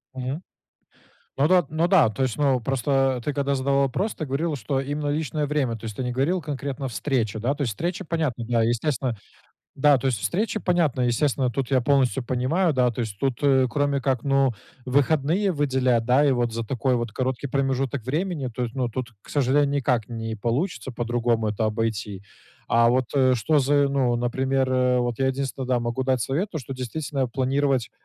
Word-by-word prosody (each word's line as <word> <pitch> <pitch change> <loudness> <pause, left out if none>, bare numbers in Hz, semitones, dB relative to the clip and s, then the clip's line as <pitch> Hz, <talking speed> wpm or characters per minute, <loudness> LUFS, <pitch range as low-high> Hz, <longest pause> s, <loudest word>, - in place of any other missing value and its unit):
Мгм. 130 +5 -4 1.0
Ну 140 +3 +4
да, 180 0 +5
т - - -17
ну 160 +3 +1
да. 175 - +5
То 110 +5 -3
есть, 130 -4 0
ну, 135 -3 +2
просто 135 +3 -2 0.3
ты 150 - -1
когда 140 0 0
задавал 140 +1 +1
вопрос, 190 - -1
ты 155 - -5
говорил, 145 +3 -1
что 135 +3 -2
именно 145 +2 -3
личное 150 0 -1
время. 140 -5 0
То 115 - -13
есть 110 -2 -6
ты - - -1
не 125 - -2
говорил 145 +9 +1
конкретно: 140 -1 -4
встреча, 115 -3 -1
да? 125 +6 0
То 145 - -4
есть 120 - -1
встреча 175 - -3
понятно, 155 -8 -2
да, 115 -2 +2
естественно 120 +1 0 0.6
Да, 140 0 +5
то 130 - -3
есть 125 -5 +1
встреча 215 - -1
понятна, 165 -9 +1
естественно, 130 +1 +1
тут 130 +1 -3
я 130 -2 +3
полностью 135 0 +2
понимаю, 135 +9 +1
да. 125 -2 +2
То 120 - -5
есть 105 -3 -6
тут, 135 -3 0
э, 135 -2 +4
кроме 145 -1 0
как, 130 -2 0
ну, 135 -2 +3 0.3
выходные 150 +8 +2
выделять, 130 -6 +1
да? 130 +5 +4
И 140 - +4
вот 120 -2 0
за 115 0 -3
такой 125 +2 0
вот 120 -3 -3
короткий 130 +2 -2
промежуток 135 -1 -1
времени, 155 +1 -2
то 125 - -3
есть, 115 -1 -4
ну, 130 -2 -1
тут, 120 +1 -5
к - - -20
сожалению, 145 +1 +2
никак 130 -6 0
не 115 -1 -4
получится 130 - -2
по-другому 120 -1 0
это 110 +1 -1
обойти. 110 -3 -2 0.5
А 115 0 +4
вот, 125 0 +2
э, 130 -2 +4
что 150 +7 +2
за 145 +1 +3
и, - - +1
ну, 130 -3 +1
например, 130 +2 0
э 125 -1 +2
Вот 120 -2 -1
я 135 - +2
единственное, 135 0 -3
да, 125 - +2
могу 120 +2 -2
дать 130 -1 +1
совет, 160 - -1
то, 160 - -4
что 135 -1 -7
действительно 130 +1 -3
планировать 135 -1 0
130 Hz, 205 wpm, -24 LUFS, 120-145 Hz, 1.0 s, да